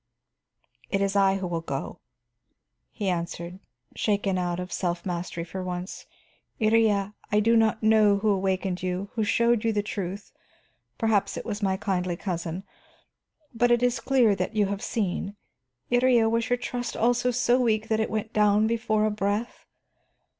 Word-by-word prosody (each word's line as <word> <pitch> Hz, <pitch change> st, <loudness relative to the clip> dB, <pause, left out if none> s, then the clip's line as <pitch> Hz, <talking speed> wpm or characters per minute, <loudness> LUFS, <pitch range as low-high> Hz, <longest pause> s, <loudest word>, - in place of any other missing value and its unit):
"It 195 Hz, -, 0 dB
is 195 Hz, 0 st, 0 dB
I 195 Hz, -1 st, +4 dB
who 195 Hz, -1 st, -3 dB
will 170 Hz, -2 st, -2 dB
go," 165 Hz, -, -5 dB, 0.9 s
he 205 Hz, -, -4 dB
answered, 170 Hz, 0 st, -3 dB, 0.4 s
shaken 200 Hz, -2 st, 0 dB
out 175 Hz, -1 st, -2 dB
of 180 Hz, 0 st, -5 dB
self 175 Hz, -2 st, -2 dB
mastery 175 Hz, -2 st, -3 dB
for 185 Hz, +2 st, -6 dB
once. 180 Hz, +1 st, -6 dB, 0.5 s
"Iría, 215 Hz, -3 st, +2 dB, 0.2 s
I 210 Hz, -, +4 dB
do 230 Hz, +2 st, +3 dB
not 220 Hz, -1 st, +2 dB
know 215 Hz, -2 st, +5 dB
who 215 Hz, +2 st, 0 dB
awakened 190 Hz, -1 st, -1 dB
you, 185 Hz, +2 st, -3 dB
who 220 Hz, -, 0 dB
showed 235 Hz, +1 st, +2 dB
you 225 Hz, -, +2 dB
the 205 Hz, -1 st, 0 dB
truth, 200 Hz, -1 st, -5 dB, 0.7 s
perhaps 220 Hz, -3 st, +1 dB
it -, -, -6 dB
was 215 Hz, -1 st, -4 dB
my 190 Hz, -1 st, +1 dB
kindly 180 Hz, -3 st, -1 dB
cousin. 175 Hz, -1 st, -4 dB, 0.9 s
But 240 Hz, +1 st, +2 dB
it 240 Hz, 0 st, +3 dB
is 245 Hz, 0 st, +2 dB
clear 250 Hz, -6 st, +3 dB
that 190 Hz, +3 st, -3 dB
you 210 Hz, -1 st, +3 dB
have 200 Hz, +1 st, -3 dB
seen. 200 Hz, -2 st, -2 dB, 0.6 s
Iría, 245 Hz, -2 st, +4 dB
was 230 Hz, +1 st, 0 dB
your 245 Hz, -, +2 dB
trust 245 Hz, 0 st, -4 dB
also 245 Hz, +2 st, +2 dB
so 245 Hz, 0 st, +2 dB
weak 220 Hz, -2 st, +1 dB
that 220 Hz, -1 st, +1 dB
it 220 Hz, -, 0 dB
went 220 Hz, +1 st, -3 dB
down 210 Hz, 0 st, +4 dB
before 220 Hz, -1 st, +1 dB
a 215 Hz, -, +1 dB
breath? 210 Hz, +3 st, -3 dB
205 Hz, 165 wpm, -26 LUFS, 190-225 Hz, 0.9 s, know